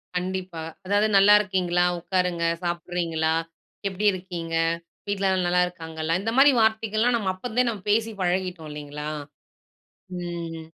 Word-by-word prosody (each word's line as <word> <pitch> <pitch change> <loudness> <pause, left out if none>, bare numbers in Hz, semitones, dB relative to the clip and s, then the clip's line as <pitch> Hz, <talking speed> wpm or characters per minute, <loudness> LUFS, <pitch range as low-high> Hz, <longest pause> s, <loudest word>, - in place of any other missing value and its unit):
கண்டிப்பா. 180 -2 -3 0.2
அதாவது, 205 +2 +3
"நல்லா 200 +1 +7
இருக்கீங்களா? 180 -3 +1
உக்காருங்க. 180 -1 0 0.2
சாப்பிடுறீங்களா? 170 -2 -1 0.5
எப்படி 195 +2 -3
இருக்கீங்க? 175 -3 -5 0.5
வீட்லல்லாம் 190 -2 +1
நல்லா 180 +1 +3
இருக்காங்களா?" 160 -2 -4
இந்த 225 +3 -2
மாரி 275 0 +7
வார்த்தைகள்லாம், 220 +2 +2
நம்ம 195 -4 0
அப்பருந்தே 245 +5 -1
நம்ம 205 -4 -8
பேசி 225 +1 +1
பழகிட்டோம் 180 -3 -1
இல்லைங்களா? 150 0 -6 1.1
ம். 170 -2 -5
180 Hz, 115 wpm, -25 LUFS, 170-205 Hz, 1.1 s, நல்லா